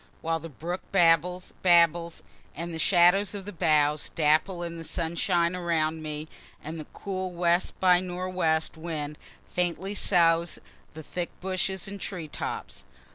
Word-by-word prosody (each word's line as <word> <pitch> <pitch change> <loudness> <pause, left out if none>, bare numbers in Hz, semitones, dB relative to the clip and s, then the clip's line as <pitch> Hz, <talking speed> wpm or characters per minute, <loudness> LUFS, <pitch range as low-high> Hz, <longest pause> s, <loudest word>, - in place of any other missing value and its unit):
While 165 0 0
the 165 - -8
brook 170 +5 -5
babbles, 180 0 +3
babbles, 170 -1 +3 0.3
and 170 +2 -5
the 160 - -4
shadows 185 +4 +4
of 195 -2 -6
the 205 - -6
boughs 150 -3 +2
dapple 165 +4 +2
in 170 -1 -5
the - - -7
sunshine 170 +2 0
around 160 -3 0
me, 155 0 -5 0.4
and 160 +2 -6
the 155 - -8
cool 185 -1 -4
west 175 +1 +1
by 180 -1 +5
nor' 180 0 -4
west 160 -4 0
wind 155 -2 -5 0.3
faintly 180 +2 -1
soughs 170 -4 +3
in - - -19 0.3
the 160 - -8
thick 175 +3 -4
bushes 190 +1 -2
and 200 0 -7
tree 175 -5 -5
tops. - - -5
170 Hz, 155 wpm, -27 LUFS, 160-180 Hz, 0.4 s, by